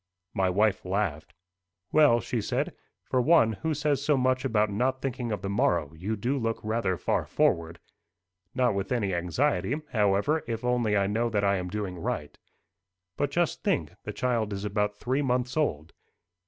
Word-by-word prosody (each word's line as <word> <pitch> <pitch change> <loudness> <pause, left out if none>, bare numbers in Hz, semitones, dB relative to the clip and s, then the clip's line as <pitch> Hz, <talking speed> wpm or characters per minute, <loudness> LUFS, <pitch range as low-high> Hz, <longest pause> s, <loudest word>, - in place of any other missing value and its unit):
My 95 -1 +1
wife 105 +2 +2
laughed. 90 -6 -2 0.6
"Well," 145 -6 +5
she - - -2
said, - - -1 0.3
"for 130 - +1
one 120 -5 +5
who 160 -1 0
says 145 -1 0
so 145 -1 +3
much 130 0 +1
about 110 -5 +1
not 130 +6 0
thinking 125 -3 -3
of 105 -2 -3
the - - -2
morrow, 85 -6 +1
you 95 +7 -3
do 125 +7 -1
look 115 -1 -1
rather 110 -4 0
far - - 0
forward." 85 0 +1 0.8
"Not 125 -3 +2
with 100 -1 -3
any 105 -6 0
anxiety, 120 - 0 0.2
however, 105 +8 +2
if 115 0 -3
only 120 -4 +2
I 100 - +2
know 115 +4 0
that 105 -2 0
I 100 0 +3
am 90 -1 -4
doing 95 -3 -4
right." 75 -2 -3 0.8
"But 145 - 0
just 170 0 0
think: 80 -1 0
the 105 - -4
child 110 -1 -1
is 100 +1 -4
about 105 0 -1
three 130 +6 -1
months 125 -2 0
old." 85 - -1
110 Hz, 175 wpm, -28 LUFS, 95-125 Hz, 0.8 s, Well